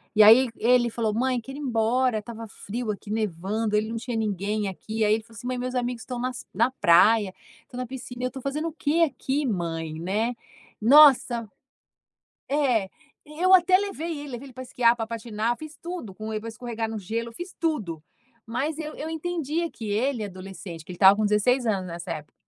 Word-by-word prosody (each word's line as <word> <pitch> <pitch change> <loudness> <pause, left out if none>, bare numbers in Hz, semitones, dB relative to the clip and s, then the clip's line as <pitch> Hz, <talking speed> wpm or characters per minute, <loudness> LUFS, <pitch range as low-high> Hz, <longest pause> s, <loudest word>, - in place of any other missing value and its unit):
e 215 - +6
aí 225 +5 +8
e - - -7
ele 245 0 +5
falou: 225 -2 -1
"Mãe, 250 +2 +1
quero 270 +4 -9
ir - - -7
embora." 245 -1 +1
Estava 225 +1 -8
frio 220 +3 -4
aqui, 205 0 -8
nevando, 210 +1 -1
ele 215 +1 +1
não 230 - -3
tinha 235 0 -4
ninguém 210 0 -1
aqui. 220 +4 -3
Aí 210 0 +4
ele 220 0 0
falou 225 0 -18
assim: 245 +2 -7
"Mãe, 255 0 -2
meus 255 +1 -3
amigos 245 -1 -2
estão 250 -1 -5
nas 250 0 -4
na 260 - +2
praia, 200 -1 +4 0.3
estão 245 - -12
na 255 - -2
piscina, 245 -1 -7
eu - - +2
estou 265 +1 -8
fazendo 295 +5 -2
o - - -13
quê 315 +2 +2
aqui, 285 -1 -2
mãe?" 165 -7 -3
Né? 210 +8 -1 0.5
Nossa! 245 -3 +6 1.0
É. 255 -9 +2 0.4
Eu 355 +5 +2
até 370 0 +7
levei 340 -6 -4
ele, 290 0 -7
levei 245 +2 -6
ele 260 - -14
pra 255 +1 -7
esquiar, 240 -2 +3
para 225 -2 -3
patinar, 230 0 -2
fiz 310 +2 -9
tudo 340 - -6
com 215 +2 -6
ele, 215 - -2
para 225 - -8
escorregar 230 -1 -4
no 220 - -4
gelo. 225 +4 -3
Eu - - -15
fiz 350 +9 -8
tudo. 215 - -2 0.4
Mas 285 +7 -2
eu 310 -1 -5
eu 310 - -5
entendia 330 0 -2
que 220 -3 -7
ele 230 +3 0
adolescente, 185 -3 -8
porque 160 - -10
ele - - -11
estava 190 +2 +8
com 215 +1 +1
16 240 +5 +2
anos 195 -4 0
nessa 170 +1 -6
época, 155 -2 -7
230 Hz, 210 wpm, -25 LUFS, 210-265 Hz, 1.0 s, aí